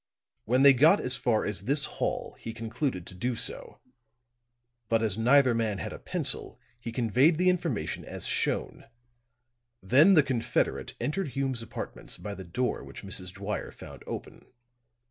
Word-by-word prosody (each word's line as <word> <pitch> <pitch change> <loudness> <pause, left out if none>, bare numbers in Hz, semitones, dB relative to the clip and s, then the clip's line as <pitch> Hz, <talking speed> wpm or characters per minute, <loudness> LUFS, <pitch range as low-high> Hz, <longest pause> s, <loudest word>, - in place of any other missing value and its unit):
When 125 +4 +3
they 140 -1 +9
got 155 +10 +5
as 125 - +2
far 110 -3 +1
as 100 -1 -3
this 140 +3 +2
hall, - - -3
he 115 - -6
concluded 115 - -3
to - - -8
do 120 +7 -2
so; 115 - -4 1.1
but 115 0 +2
as 105 -4 +1
neither 125 +3 +4
man 110 -3 0
had - - -5
a - - -9
pencil, - - -2 0.2
he 115 0 -6
conveyed 125 - +3
the 180 +1 +4
information 170 - -1
as - - -6
shown; - - -1 0.9
then 145 - +5
the 155 - +7
confederate 130 -4 -1
entered 190 +5 -1
Hume's 135 -3 -1
apartments 115 - -7
by 105 - -6
the 95 - -8
door 120 +9 -2
which - - -10
Mrs. 90 -2 -4
Dwyer 100 +2 -4
found - - -12
open. - - -7
120 Hz, 160 wpm, -28 LUFS, 105-140 Hz, 1.1 s, they